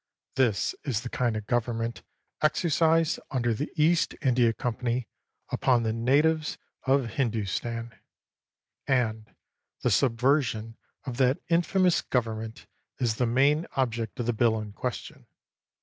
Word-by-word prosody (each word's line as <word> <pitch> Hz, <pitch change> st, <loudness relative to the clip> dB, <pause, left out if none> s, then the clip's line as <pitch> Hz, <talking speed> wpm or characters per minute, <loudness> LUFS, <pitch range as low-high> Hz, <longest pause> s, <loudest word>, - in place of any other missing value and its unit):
This 120 Hz, -6 st, +1 dB
is 125 Hz, -7 st, -1 dB
the 125 Hz, -, -6 dB
kind 120 Hz, -3 st, 0 dB
of 105 Hz, -, -5 dB
government 115 Hz, 0 st, -1 dB, 0.4 s
exercised 160 Hz, +1 st, +2 dB
under 120 Hz, -3 st, 0 dB
the 140 Hz, +7 st, -4 dB
East 165 Hz, +1 st, +2 dB
India 125 Hz, -3 st, +4 dB
Company 120 Hz, 0 st, -2 dB, 0.4 s
upon 125 Hz, -3 st, +2 dB
the 110 Hz, -1 st, 0 dB
natives 150 Hz, +7 st, +2 dB, 0.3 s
of 135 Hz, -1 st, +3 dB
Hindustan; 115 Hz, -1 st, -2 dB, 0.9 s
and 110 Hz, -4 st, 0 dB, 0.5 s
the -, -, +2 dB
subversion 120 Hz, -3 st, +1 dB, 0.3 s
of 125 Hz, -3 st, -5 dB
that 130 Hz, +1 st, +3 dB
infamous 175 Hz, +1 st, +3 dB
government 115 Hz, -2 st, -3 dB, 0.3 s
is 115 Hz, -3 st, 0 dB
the 125 Hz, -, +1 dB
main 140 Hz, +7 st, +3 dB
object 115 Hz, -4 st, -1 dB
of 120 Hz, -, -1 dB
the 120 Hz, -, +1 dB
bill 110 Hz, 0 st, +2 dB
in 105 Hz, -1 st, -6 dB
question. -, -, -6 dB
120 Hz, 125 wpm, -27 LUFS, 115-140 Hz, 0.9 s, India